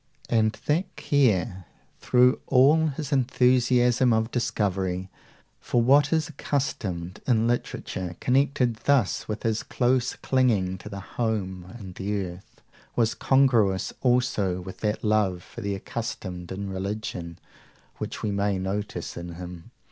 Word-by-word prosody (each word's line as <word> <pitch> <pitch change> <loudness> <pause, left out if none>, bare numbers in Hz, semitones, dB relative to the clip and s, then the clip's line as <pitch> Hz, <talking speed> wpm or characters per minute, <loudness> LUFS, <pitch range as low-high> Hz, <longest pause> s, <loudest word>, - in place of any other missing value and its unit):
And 110 -2 +2
that 175 +6 0
care, 95 - +1 0.3
through 125 +1 +4
all 145 +5 +5
his 145 -1 -4
enthusiasm 125 -2 +3
of 110 +1 0
discovery, 95 -5 -1 0.5
for 120 - 0
what 140 +4 +5
is 160 -2 +2
accustomed, 110 - -3
in 115 -3 +3
literature, 95 -6 -2
connected 130 -3 +2
thus 135 -5 +1
with 105 -1 -4
his 110 -1 0
close 125 0 0
clinging 105 -9 +1
to 100 -1 -7
home 95 -4 -3
and 95 -5 -9
the 100 +2 -2
earth, 90 0 -8 0.3
was 115 -2 +2
congruous 120 -8 +2
also 120 -8 +1
with 95 +1 -9
that 105 0 -1
love 105 -5 +1
for 120 - -10
the 100 -2 -2
accustomed 95 -4 -5
in 95 +1 -4
religion, 95 -3 -4 0.6
which - - -5
we 105 - 0
may 100 0 0
notice 100 +3 -4
in 85 0 -7
him. 90 -1 -9
110 Hz, 130 wpm, -26 LUFS, 95-125 Hz, 0.6 s, all